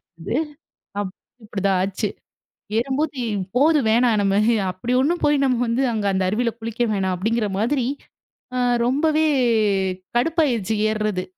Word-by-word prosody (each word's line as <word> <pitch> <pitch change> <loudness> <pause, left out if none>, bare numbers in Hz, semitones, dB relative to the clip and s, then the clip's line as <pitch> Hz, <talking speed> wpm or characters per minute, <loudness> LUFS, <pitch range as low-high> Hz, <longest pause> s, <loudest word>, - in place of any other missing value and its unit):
இருந்தது. 170 +6 -8 0.7
அப் 190 -2 -4 0.3
அப்படிதான் 195 -3 0
ஆச்சு. 195 +2 -2 0.7
ஏறும்போது, 275 +3 -1 0.4
"போதும் 290 -3 +4
வேணாம். 230 -1 +3
நம்ம 195 0 +2 0.3
அப்படி 230 +7 -3
ஒண்ணும் 340 +5 0
போய் 295 -1 +4
நம்ம 255 -2 +2
வந்து 240 +4 +1
அங்க 210 -2 -2
அந்த 190 0 0
அருவியில 230 +3 0
குளிக்க 230 +1 -2
வேணாம்." 190 -2 0
அப்படிங்கிற 220 +3 0
மாதிரி, 240 +4 +1 0.7
ஆ - - -1 0.3
ரொம்பவே 310 +4 +2 0.9
கடுப்பா 325 +5 +2
ஆயிருச்சு 225 -4 -1
ஏர்றது. 215 -4 -1
230 Hz, 130 wpm, -22 LUFS, 200-270 Hz, 0.9 s, போதும்